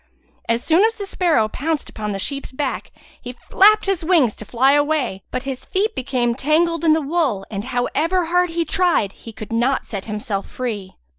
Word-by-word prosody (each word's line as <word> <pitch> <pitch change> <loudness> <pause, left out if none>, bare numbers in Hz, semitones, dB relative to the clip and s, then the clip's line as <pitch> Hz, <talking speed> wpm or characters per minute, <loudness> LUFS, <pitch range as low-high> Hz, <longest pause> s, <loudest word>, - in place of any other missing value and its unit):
As 230 +1 +1
soon 335 +4 +4
as 450 +1 +2
the 410 - -5
sparrow 335 - +1
pounced 300 +7 -3
upon 210 -1 -5
the 195 - -3
sheep's 275 +8 -4
back 265 0 -3 0.3
he 245 0 -7
flapped 420 - +4
his 390 -4 -1
wings 315 - +3
to 215 - -8
fly 255 +5 +3
away, 290 -8 +1
but 255 - -3
his 265 -1 -5
feet 425 +4 -1
became 250 -2 0
tangled 320 +5 +1
in 320 -2 +5
the 315 -1 +1
wool 275 - 0
and, 200 0 -4
however 300 +8 0
hard 355 +1 +2
he 335 0 -1
tried, 350 - +1
he 230 - -12
could 215 0 -8
not 245 +4 +1
set 200 -4 -6
himself 210 -2 -4
free. 215 -7 -5
275 Hz, 195 wpm, -20 LUFS, 230-335 Hz, 0.3 s, in